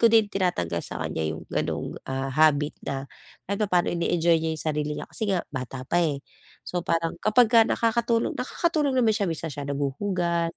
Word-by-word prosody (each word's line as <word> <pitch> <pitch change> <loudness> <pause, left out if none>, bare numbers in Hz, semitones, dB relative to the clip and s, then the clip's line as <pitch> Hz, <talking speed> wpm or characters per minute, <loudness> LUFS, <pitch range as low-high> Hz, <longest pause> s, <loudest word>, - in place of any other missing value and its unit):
ko 230 - +7
din 225 -1 +5
tinatanggal 90 - 0
sa - - -6
kaniya 80 -1 -2
'yong - - -10
gano'ng, - - -2
ah, 135 0 -2
habit 150 0 +3
na 135 0 -3 0.4
kahit 200 +2 -3
papaano 180 -4 +2
ine-enjoy 170 -1 +2
niya 160 - -1
'yong - - -4
sarili 150 -1 -1
niya - - -5
kasi 220 -2 -4
nga 185 -3 +1
bata 130 -1 -5
pa, 175 +6 +1
eh. 145 -5 -1 0.4
So 180 - -2
parang, 165 -1 -1
kapagka 230 +1 +5
nakakatulong 230 0 +1
nakakatulong 290 0 0
naman 230 -3 +4
siya, 200 -3 0
minsan 165 -2 -3
siya 140 +1 -6
naghuhugas, 170 +4 -1
170 Hz, 180 wpm, -26 LUFS, 145-215 Hz, 0.4 s, ko